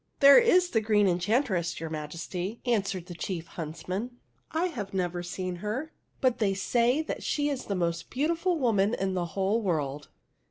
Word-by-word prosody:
"There 280 -1 +9
is 365 -7 +4
the 225 - +2
Green 210 -2 +3
Enchantress, 180 - +1
your 165 0 -5
Majesty," 170 +7 -5
answered 195 -7 0
the 180 - -8
chief 170 -1 -4
huntsman. 180 +10 -5 0.2
" - - -41
I 325 +3 +1
have 210 - -4
never 175 -1 -1
seen 180 0 -4
her, 225 - -4 0.3
but 255 -3 +2
they 200 -3 +2
say 240 +9 +2
she 290 0 0
is 275 -3 -3
the 200 - -2
most 170 -2 -1
beautiful 335 +6 0
woman 220 -6 +2
in 190 0 -1
the 180 -2 -1
whole 200 +4 +2
world." 150 -7 -2
195 Hz, 170 wpm, -28 LUFS, 175-250 Hz, 0.3 s, There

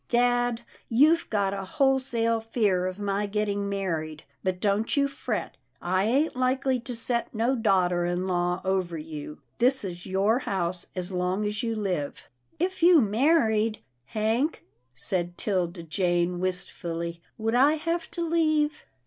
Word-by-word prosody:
" - - -45
Dad, 245 -1 +2 0.3
you've 305 +8 +4
got 200 -3 +1
a 195 -1 -4
wholesale 240 0 +1
fear 205 -5 +1
of 185 0 -5
my 205 0 -1
getting 205 -1 -1
married, 160 -6 -3 0.2
but 185 -1 -1
don't 210 +7 +1
you 280 0 +4
fret. 245 -8 -4 0.2
I 185 +2 +1
ain't 270 +8 +2
likely 255 0 +1
to 240 +1 -6
set 235 +1 0
no 235 +4 +2
daughter 185 -6 +2
in 175 +1 -1
law 180 0 0
over 185 -3 0
you. 150 -1 -7 0.2
This 255 +1 +3
is 175 -2 -6
your 200 +5 +2
house 180 -6 -2
as 180 0 -4
long 185 +3 -1
as 210 +2 -2
you 230 -2 -1
live." 185 -9 -3
" 120 - -39
If 375 - -13
you 345 -1 +7
married. 220 -2 +2 0.3
Hank," 225 - -1 0.3
said 175 -2 -2
'Tilda 180 -4 -1
Jane 175 +1 0
wist 185 0 -2
fully, 170 0 -5 0.2
"would 225 +1 -1
I 270 +5 +5
have 335 +2 -2
to 340 - -3
leave?" 310 -2 +1
205 Hz, 155 wpm, -27 LUFS, 180-245 Hz, 0.3 s, you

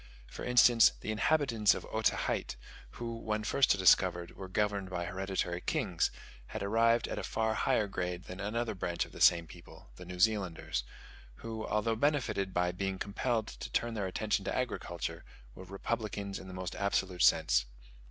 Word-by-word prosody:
For - - -9
instance, 125 -1 +6
the 110 - -3
inhabitants 115 -2 +2
of - - -6
Otaheite, - - 0 0.4
who, 115 -1 -5
when 110 -1 -2
first 130 -1 +3
discovered, 90 -2 +4
were 95 - -7
governed 100 0 -1
by 90 -2 -3
hereditary 95 -1 -2
kings, - - 0 0.4
had - - -5
arrived 115 +3 +3
at - - -4
a - - -5
far 110 -1 0
higher 120 -1 +1
grade 90 -2 -4
than 90 0 -9
another 110 +3 -2
branch 90 -3 -2
of - - -16
the - - -10
same 85 -1 +6
people, 85 +2 -14
the 90 - -10
New 90 0 -8
Zealanders, 90 - +1 0.6
who, 110 -1 -4
although 105 +2 0
benefited 120 -7 0
by 90 0 +1
being 95 +1 -3
compelled 110 +3 -1
to - - -8
turn 120 0 -1
their 100 -4 -2
attention 105 +2 -1
to - - -2
agriculture, 105 -9 -3 0.3
were 95 - -11
republicans 100 0 -4
in 95 - -10
the 95 - -8
most 95 -1 -5
absolute 95 -3 -1
sense. - - +4
100 Hz, 170 wpm, -32 LUFS, 90-115 Hz, 0.6 s, instance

